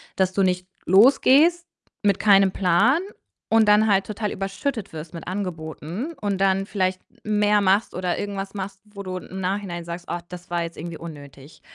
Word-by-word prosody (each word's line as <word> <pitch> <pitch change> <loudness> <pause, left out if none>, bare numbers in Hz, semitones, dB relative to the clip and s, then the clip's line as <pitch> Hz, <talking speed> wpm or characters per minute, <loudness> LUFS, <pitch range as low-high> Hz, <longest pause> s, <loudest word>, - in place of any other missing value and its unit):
Dass 190 -1 +1
du 200 - +1
nicht 180 0 0 0.2
losgehst 275 - +5 0.4
mit 200 -1 +3
keinem 195 -2 +5
Plan 210 - +3 0.5
und 225 -1 +4
dann 210 +1 +5
halt 195 -2 +3
total 210 0 -3
überschüttet 195 +4 -4
wirst 155 +1 -8
mit 165 - -8
Angeboten. 180 - -5
Und 200 -2 -1
dann 195 0 +2
vielleicht 185 -2 -1 0.2
mehr 210 -1 +2
machst 200 +3 +2
oder 180 -1 -1
irgendwas 200 -1 -4
machst, 195 0 -6
wo 200 -1 -10
du 185 -1 -4
im 190 +1 -8
Nachhinein 185 -2 -3
sagst. 170 +1 -7
„Oh, 175 - -1
das 180 0 -10
war 170 -1 -1
jetzt 165 0 -7
irgendwie 170 0 -6
unnötig.“ 145 -3 -11
195 Hz, 175 wpm, -23 LUFS, 180-210 Hz, 0.5 s, losgehst